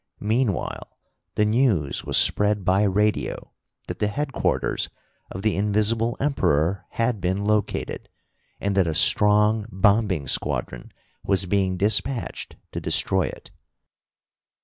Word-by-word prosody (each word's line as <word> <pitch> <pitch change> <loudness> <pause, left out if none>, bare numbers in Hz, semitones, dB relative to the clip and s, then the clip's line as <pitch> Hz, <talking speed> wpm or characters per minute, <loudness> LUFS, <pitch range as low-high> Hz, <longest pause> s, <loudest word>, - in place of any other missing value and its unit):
Meanwhile 110 -1 -2 0.4
the 105 - +2
news 105 - +1
was - - -1
spread 105 -2 +2
by 95 +1 +3
radio 105 +1 0 0.3
that - - -7
the 105 - +1
headquarters 140 +5 -1 0.4
of 95 - -7
the 110 - +1
Invisible 110 +3 +1
Emperor 95 - 0
had 115 -3 -1
been 95 +3 -1
located, 105 0 -1 0.5
and 100 -1 -1
that 95 -3 +3
a 80 - -2
strong 105 +3 +3
bombing 95 -5 +2
squadron - - -2 0.3
was 95 -1 0
being 95 -1 0
dispatched 110 +6 -1 0.2
to - - -5
destroy - - +2
it. - - -10
105 Hz, 120 wpm, -24 LUFS, 95-110 Hz, 0.5 s, by